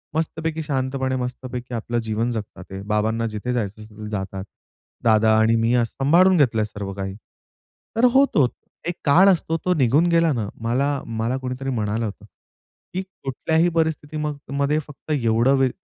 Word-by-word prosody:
मस्तपैकी 160 0 -2
शांतपणे 130 -2 -1
मस्तपैकी 125 0 -5
आपलं 120 +1 -2
जीवन 115 +1 -1
जगतात 105 -4 -6
आहे. 95 0 -6
बाबांना 110 +2 0
जिथे 110 +3 -3
जायचं 110 -2 -3
असेल 105 0 -10
जातात. 95 -2 -4 0.6
दादा 110 -1 +4
आणि 110 +1 +4
मी 115 +1 +2
असं 120 -2 +1
सांभाळून 180 +5 +5
घेतलं 120 -7 +3
आहे - - +1
सर्व 105 -2 -6
काही. 95 -1 -5 0.8
तर 235 +2 +4
होतोच 265 - +4 0.4
एक 175 - -1
काळ 180 +8 +6
असतो 165 -2 +1
तो 180 - +3
निघून 145 +4 +3
गेला 165 -1 +4
ना 110 -4 -2
मला, 135 +5 0
मला 115 +3 -2
कोणीतरी 130 +1 -4
म्हणालं 110 -1 -1
होतं 105 0 -7 0.7
की 185 - -1 0.2
कुठल्याही 160 +6 +1
परिस्थिती 160 -2 -1
मग 150 -1 -2 0.2
मध्ये 145 +2 +2
फक्त 150 +1 -10
एवढं 120 0 +3
वी 130 -1 +4
125 Hz, 165 wpm, -23 LUFS, 110-150 Hz, 0.8 s, काळ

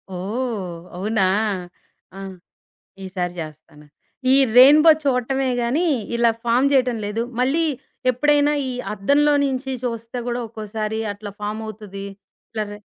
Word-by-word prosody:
ఓహ్! 200 -2 -3 0.2
అవునా! 200 +1 +1 0.9
ఆ! - - -7 0.9
ఈసారి 180 -2 -3
జేస్తాను. 150 -1 -9 0.5
ఈ - - +6 0.2
రైన్ 275 +4 +9
బో 330 - +9
చూడటమే 265 0 +1
గాని 280 +9 +1 0.3
ఇలా 235 -1 +4
ఫార్మ్ 245 +4 +3
జేయటం 255 -3 +3
లేదు. 215 +3 -2 0.2
మళ్ళీ 280 +6 +2 0.5
ఎప్పుడైనా 290 +3 +3 0.2
ఈ - - -2 0.2
అద్దంలో 285 +9 +3
నుంచి 265 -1 -2
చూస్తే 230 0 -4
గూడా 245 0 -2
ఒక్కోసారి 215 0 -4
అట్లా 205 0 -8
ఫార్మ్ 210 +1 -3
అవుతది. 200 -2 -8 0.5
ఇట్ల 220 -1 -2
రె 205 - -8
230 Hz, 125 wpm, -22 LUFS, 205-260 Hz, 0.9 s, రైన్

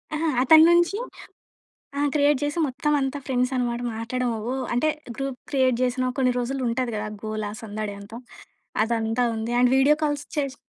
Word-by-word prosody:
అహా! 320 +1 -1
అతని 315 +4 +8
నుంచి 345 +4 +3 1.0
ఆ! - - +1
క్రియేట్ 290 -2 +3
చేసి 290 +3 -2
మొత్తం 285 +3 -2
అంతా 270 +1 -2
ఫ్రెండ్స్ 250 -1 0
అన్నమాట 240 -1 -1
మాట్లాడడం 245 +2 -2 0.2
ఓహ్, 265 -1 -2
అంటే 245 +6 +1 0.3
గ్రూప్ 270 -2 -4
క్రియేట్ 260 -3 +3
చేసిన 255 0 0
కొన్ని 255 -1 +3
రోజులు 265 +2 -2
ఉంటది 235 +1 -1
గదా 210 0 -3 0.2
గోలా 215 -1 -3
సందడి 215 -1 -5
అంతా. 220 +3 -10 0.7
అదంతా 225 +1 0
ఉంది. 225 +2 -3
అండ్ 250 - +5
వీడియో 275 +3 +5
కాల్స్ 290 -1 -1
చేసి 275 -2 -1
255 Hz, 165 wpm, -24 LUFS, 235-280 Hz, 1.0 s, అతని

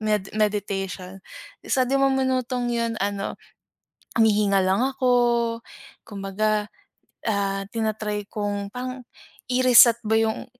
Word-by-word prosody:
med 210 -3 -1
meditation 195 -3 -2 0.4
isa 260 -2 +1
di 260 +2 -1
mo 275 - +4
minutong 255 -2 0
'yun 230 -1 -1
ano, 200 0 -3 0.8
humihinga 205 -3 +3
lang 190 +2 +2
ako 240 -3 +1 0.5
kumbaga, 210 +1 -1 0.6
ah, 200 -2 -1
tina-try 215 -2 -3
kung 205 -1 -3
pang 255 +3 -6 0.5
i-reset 250 -2 +6
ba 220 0 +2
yung 220 0 -1
215 Hz, 110 wpm, -24 LUFS, 200-245 Hz, 0.8 s, i-reset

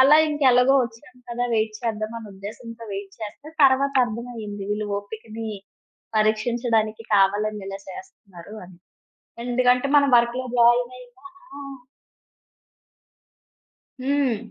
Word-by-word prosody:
అలా 275 +3 +8
ఇంక 295 -1 -3
ఎలాగో 250 +2 +5
వచ్చాం 235 +3 -9
కదా! 240 +1 -2
వెయిట్ 215 -1 0
చేద్దాం 215 -1 -2
అనే 220 -2 -10
ఉద్దేశంతో 230 +4 -9
వెయిట్ 195 0 -6
చేస్తే, 220 +8 -8
తరువాత 275 +1 +4
అర్థమయింది 225 -3 -6
వీళ్ళు 210 0 -1
ఓపికని 220 +2 -8 0.7
పరీక్షించడానికి 220 0 +1
కావాలని 205 +1 +2
ఇలా 195 0 -6
చేస్తన్నారు 210 - -12
అని. 175 -1 -16 0.7
ఎందుకంటే 250 +1 +2
మనం 280 -1 +4
వర్క్‌లో 240 +2 +1
జాయిన్ 240 +1 +4
అయినా 245 -1 -15 0.4
ఆ! - - -8 2.5
హ్మ్. 275 -4 +1
230 Hz, 110 wpm, -23 LUFS, 215-250 Hz, 2.5 s, అలా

